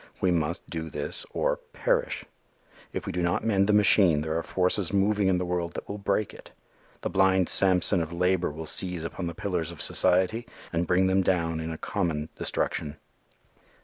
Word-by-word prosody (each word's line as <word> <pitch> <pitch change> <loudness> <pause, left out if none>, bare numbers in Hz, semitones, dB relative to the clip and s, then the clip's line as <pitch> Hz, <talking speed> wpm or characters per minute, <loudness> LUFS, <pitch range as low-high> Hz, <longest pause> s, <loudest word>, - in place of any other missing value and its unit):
We 95 - +2
must 85 0 -1
do 80 -1 -5
this 75 -1 -3
or - - 0 0.2
perish. - - 0 0.7
If - - -5
we - - -3
do 90 - -2
not 85 +4 0
mend 100 -3 +2
the - - +3
machine, 100 -6 +5
there 80 +1 -2
are 85 - 0
forces 90 +1 0
moving 100 0 +2
in 95 -1 +3
the 90 - -2
world 85 -1 -2
that - - -6
will 105 +1 -6
break 100 +1 -1
it. - - -13 0.5
The - - -2
blind 95 -1 +3
Samson 95 -1 +3
of 80 0 -4
labor 90 +1 +1
will 80 +2 -7
seize 90 +1 0
upon 85 +2 -4
the 85 - -5
pillars 85 -4 -2
of 85 - -12
society 95 +6 +2 0.3
and 85 +1 0
bring 90 +2 +3
them 95 +1 +3
down 85 -3 0
in 80 0 -4
a 80 - -5
common 80 -7 -2
destruction. 75 0 -2
90 Hz, 190 wpm, -27 LUFS, 80-95 Hz, 0.7 s, machine